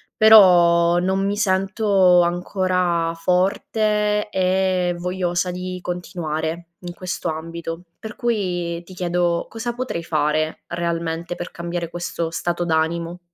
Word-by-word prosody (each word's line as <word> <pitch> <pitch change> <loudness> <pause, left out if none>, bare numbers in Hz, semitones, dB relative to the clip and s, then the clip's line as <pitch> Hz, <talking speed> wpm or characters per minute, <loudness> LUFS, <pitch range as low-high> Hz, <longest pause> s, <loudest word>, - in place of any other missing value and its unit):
però 175 -5 +6
non 190 +2 0
mi 200 +1 0
sento 195 -2 +3
ancora 175 -1 0
forte 210 +4 0
e 185 -2 +1
vogliosa 180 0 -1
di 180 0 -5
continuare 170 -2 -4
in 175 -1 -7
questo 180 -1 -4
ambito, 165 +1 -6 0.2
per 220 -1 -8
cui, 175 -7 -2
ti 185 - -12
chiedo 175 -1 0
cosa 230 +1 -4
potrei 245 -9 -4
fare 155 0 0
realmente 170 0 -3
per 175 - -6
cambiare 170 0 -4
questo 170 -1 -3
stato 175 +1 -2
d'animo? 170 +1 -1
175 Hz, 115 wpm, -21 LUFS, 170-190 Hz, 0.2 s, però